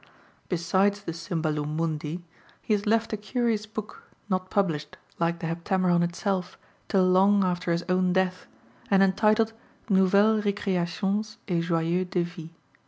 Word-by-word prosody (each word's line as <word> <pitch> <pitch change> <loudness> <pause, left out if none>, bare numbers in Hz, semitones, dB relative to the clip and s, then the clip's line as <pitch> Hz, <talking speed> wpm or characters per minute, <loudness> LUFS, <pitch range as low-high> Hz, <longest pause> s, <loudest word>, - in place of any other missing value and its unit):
Besides 190 +4 +1
the 170 - -4
Cymbalum 155 -3 -2
Mundi, 160 +1 -2 0.4
he 215 - +1
has 205 0 -1
left 225 +1 +1
a - - 0
curious 220 0 -1
book, 215 0 -7 0.3
not 185 -1 -1
published, 160 -7 -1 0.2
like 170 0 +1
the 165 - -5
Heptameron 175 +1 +1
itself, 180 +1 -2 0.3
till 190 -2 +3
long 195 +2 +4
after 180 -1 -1
his 170 +1 0
own 185 0 +2
death, 185 0 0 0.4
and 195 -1 +5
entitled 215 +3 +3 0.4
Nouvelles 200 +3 +4
Récréations 200 +2 -1
et 175 -4 +1
Joyeux 170 +2 0
Devis. 175 -2 -3
185 Hz, 135 wpm, -26 LUFS, 170-205 Hz, 0.4 s, and